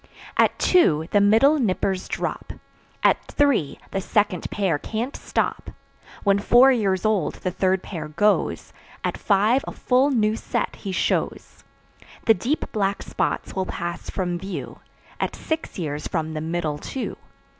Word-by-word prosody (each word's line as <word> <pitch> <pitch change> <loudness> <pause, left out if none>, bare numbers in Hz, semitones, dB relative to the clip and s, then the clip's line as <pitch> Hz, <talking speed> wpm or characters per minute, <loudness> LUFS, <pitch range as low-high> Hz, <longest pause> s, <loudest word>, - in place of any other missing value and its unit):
At - - +3
two 160 - +3
the 205 - +4
middle 225 +9 +5
"nippers" 190 -4 0
drop; - - -4 0.5
At - - +4
three, 275 - +1
the 195 - -1
second 205 -3 0
pair 190 -8 0
can't 230 - -4
stop. - - -2 0.5
When 200 -1 +3
four 245 +6 +6
years 200 -6 +1
old 210 -7 +1
the 185 - -3
third 185 +1 +1
pair 160 -6 -6
goes; 205 +8 0 0.3
At - - -1
five 215 +6 +2
a - - -3
full 260 +3 +2
new 220 -5 +2
set - - -3
he 195 - -5
shows. 185 - -2 0.6
The 225 - +7
deep 245 - -1
black 200 -2 -1
spots - - -2
will 190 -1 -1
pass 170 0 -5
from 175 -2 -2
view 190 +1 -6 0.4
At - - -2
six 320 0 -4
years 150 -4 -3
from 160 -2 -2
the 155 - -3
middle 160 -2 -2
two. 265 - -5
195 Hz, 150 wpm, -23 LUFS, 175-225 Hz, 0.6 s, The